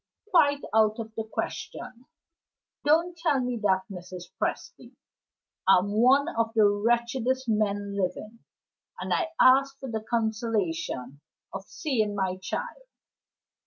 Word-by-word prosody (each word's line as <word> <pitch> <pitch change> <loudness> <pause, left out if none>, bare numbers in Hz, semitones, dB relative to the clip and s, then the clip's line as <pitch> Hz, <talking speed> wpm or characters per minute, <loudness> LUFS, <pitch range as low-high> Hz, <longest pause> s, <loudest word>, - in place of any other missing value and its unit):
"Quite 285 -5 +4
out 215 -1 +3
of 225 -1 -7
the 220 - -3
question." 240 +2 -6 0.8
"Don't 330 +4 +2
tell 325 -5 +1
me 250 -1 -2
that, 190 -3 +1
Mrs. 180 -2 -9
Presty! - - -4 0.7
I'm 195 +1 +4
one 255 +7 +4
of 230 -7 -1
the 215 -2 +5
wretchedest 240 +4 0
men 205 -2 0
living, 200 +4 -3 0.6
and - - -2
I 335 - +1
ask 275 +1 +5
for 265 -3 -6
the 220 -1 -2
consolation 210 - -2 0.3
of 195 0 -6
seeing 220 -9 -1
my 190 -2 -1
child. - - -6
220 Hz, 125 wpm, -27 LUFS, 200-260 Hz, 0.8 s, the